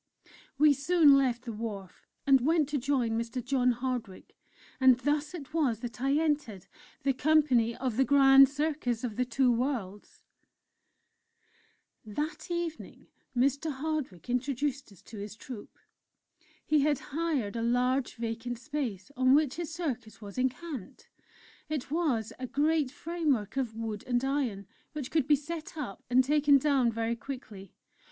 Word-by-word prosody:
We 295 +1 +6
soon 295 +1 +5
left 250 -3 +1
the 235 - -4
wharf, 205 -4 -7 0.2
and 270 -2 +5
went 310 +2 +2
to 295 -1 -1
join 255 -3 0
Mr. 230 +2 -3
John 255 -1 +2
Hardwick. 245 -5 -5 0.4
And 260 -2 +6
thus 295 +4 -1
it 300 -3 -9
was 265 -9 +1
that 240 0 -7
I 270 +1 +2
entered 290 - -1 0.4
the 275 0 +2
company 260 -5 +3
of 250 -4 -3
"The 265 - +5
Grand 270 -1 +7
Circus 285 -5 -2
of 230 -4 -3
the 250 - 0
Two 250 +1 +2
Worlds." 230 -5 -3 1.8
That 295 - -5
evening 340 -2 -5 0.3
Mr. 280 +5 +1
Hardwick 280 - -4
introduced 270 +1 -2
us 195 - -18
to 220 - -10
his 205 +1 -7
Troupe. 225 -1 -10 0.9
He 305 - +3
had 290 0 +2 0.2
hired 290 -10 -1
a 230 - -2
large 250 +3 +1
vacant 230 +1 -4
space 250 -5 -4
on 255 +1 +4
which 300 -1 +1
his 345 -2 -4
circus 265 -10 -4
was 200 -2 -10
encamped; 260 - -4 0.6
it 290 -4 -4
was 285 -10 0
a 255 - -4
great 300 +1 +1
framework 290 - -2
of 250 -5 -2
wood 220 -2 -4
and 245 +1 +1
iron, 260 -8 -1 0.3
which 290 -4 -5
could 310 -4 +1
be 300 - +6
set 315 +3 -7
up 250 -10 -6
and 255 +1 +5
taken 290 +1 +4
down 270 -4 +2
very 230 +1 -1
quickly. 220 -6 -9
260 Hz, 150 wpm, -30 LUFS, 235-295 Hz, 1.8 s, Grand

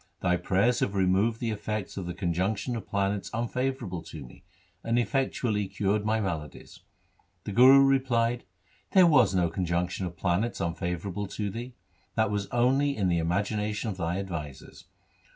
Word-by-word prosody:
Thy 90 -1 +2
prayers 100 +7 +1
have 100 - -1
removed 100 +4 +2
the 115 -2 -1
effects 105 -1 -4
of 95 -3 -5
the 90 - -5
conjunction 95 +6 -1
of 115 - -6
planets 100 0 -1
unfavourable 120 -5 -2
to 80 -4 -9
me, 60 - -16 0.4
and 115 +1 0
effectually 120 -5 0
cured 100 +2 0
my 110 +1 +1
maladies.' 80 -8 -5 0.6
The - - -5
Guru 130 +5 +7
replied, 120 -3 +1 0.2
' - - -35
There 185 -2 +7
was 150 - +4
no 90 -2 +3
conjunction 90 +1 -1
of 85 0 -10
planets 95 +5 0
unfavourable 90 +3 -3
to 100 +1 -4
thee. 120 +4 -7 0.4
That 110 -2 +1
was 100 -1 -2
only 135 +3 +2
in 95 -3 +1
the 85 -1 +2
imagina 100 +5 -1
tion 110 +1 -3
of 95 - -7
thy 85 0 -2
advisers. 80 -8 -7
100 Hz, 165 wpm, -28 LUFS, 90-115 Hz, 0.6 s, Guru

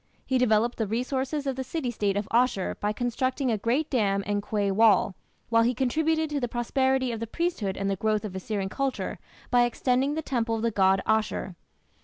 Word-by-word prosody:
He 260 -1 +1
developed 235 0 +2
the 220 - 0
resources 260 +6 -2
of 270 -1 -1
the 265 - -3
city 260 -1 -3
state 205 -3 -1
of 205 - -2
Asshur 240 -5 +2
by 210 - 0
constructing 255 +3 -1
a 220 - +1
great 250 +9 0
dam 200 -6 +1
and 205 0 -1
quay 205 -1 -1
wall, 205 -1 +4 0.4
while 230 0 +4
he 240 +2 +2
contributed 315 +5 +1
to 290 - 0
the 245 - -1
prosperity 260 +2 0
of 230 - -4
the 230 - -4
priesthood 230 - -2
and 195 - -2
the 195 - +1
growth 215 +2 0
of 195 -3 -6
Assyrian 195 +1 -3
culture 270 +6 -3 0.3
by 245 -1 +5
extending 255 +4 +1
the 320 - -3
temple 235 -5 -1
of 220 - -3
the 230 - +1
god 190 -1 +3
Ashur. 215 -4 0
235 Hz, 205 wpm, -27 LUFS, 210-260 Hz, 0.4 s, by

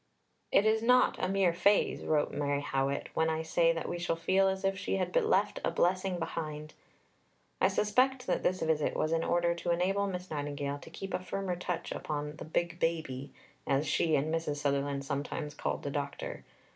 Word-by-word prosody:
"It 200 - +5
is 220 0 +3
not 250 +2 +4
a 185 - +1
mere 190 -3 +3
phrase," 200 +4 +2
wrote 150 -2 +1
Mary 145 0 -1
Howitt, 135 0 -1
"when 160 0 +2
I 160 0 -1
say 165 +1 +3
that 165 0 -3
we 175 - -3
shall 170 -1 0
feel 190 +3 +3
as 190 0 -1
if 195 0 +2
she 185 - -2
had 180 -2 -2
left 195 +2 +2
a - - +2
blessing 185 +1 +1
behind." 155 -2 -5 0.9
I - - +6
suspect 255 +5 +2
that - - 0
this 185 0 0
visit 160 -2 +1
was 155 - 0
in 165 0 +1
order 175 0 +2
to 170 +1 -4
enable 190 +4 +1
Miss 180 -2 -5
Nightingale 145 -1 -3
to - - -12
keep 195 -1 -7
a - - +1
firmer 185 0 -3
touch 175 -1 -4
upon 150 0 -4
the - - -7
"Big 170 +2 -1
Baby," 150 -6 -2 0.4
as 140 +2 +2
she 160 0 +2
and 155 +3 0
Mrs. 165 -3 -1
Sutherland 140 -1 -1
sometimes 145 +1 -3
called - - -3
the 140 - -3
doctor. 140 0 -4
165 Hz, 195 wpm, -31 LUFS, 145-185 Hz, 0.9 s, I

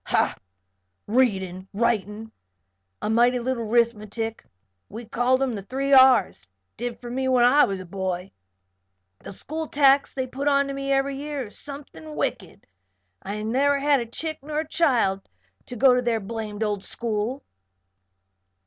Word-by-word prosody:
"Ha! - - +1 0.7
Readin', 195 -6 0
writin', 220 0 -1 0.7
an' 215 - 0
mighty 240 +2 +4
little 240 -2 -2
'rithmatic 225 -1 0 0.5
we 230 +3 -8
called 250 +4 +1
'em 260 -3 -1
'the 205 - -5
three 270 +7 -2
R's 255 - +5
' 95 - -52
did 245 -1 -4
for 240 -1 -8
me 260 +1 -1
when 255 -2 +4
I 285 +4 +6
was 195 -1 -4
a - - -9
boy. 185 0 -4 0.9
The - - -10
school 315 +10 -5
tax 280 -1 +4
they 260 -1 -1
put 270 +3 -4
onto 280 -1 +2
me 275 0 -3
ev'ry 275 0 +1
year 290 -2 -4
is 205 - -10
something 295 +2 -9
wicked. - - -4 0.6
And 200 +2 -5
I 210 - -5
never 275 +6 +2
had 275 -5 +1
chick 315 +4 -4
nor 300 +2 -3
child 260 - +1 0.4
to 245 - -7
go 255 +2 +5
to 250 - +2
their 235 -2 0
blamed 215 0 -5
old 205 -2 -2
school." 230 +4 -3
245 Hz, 155 wpm, -24 LUFS, 210-275 Hz, 0.9 s, I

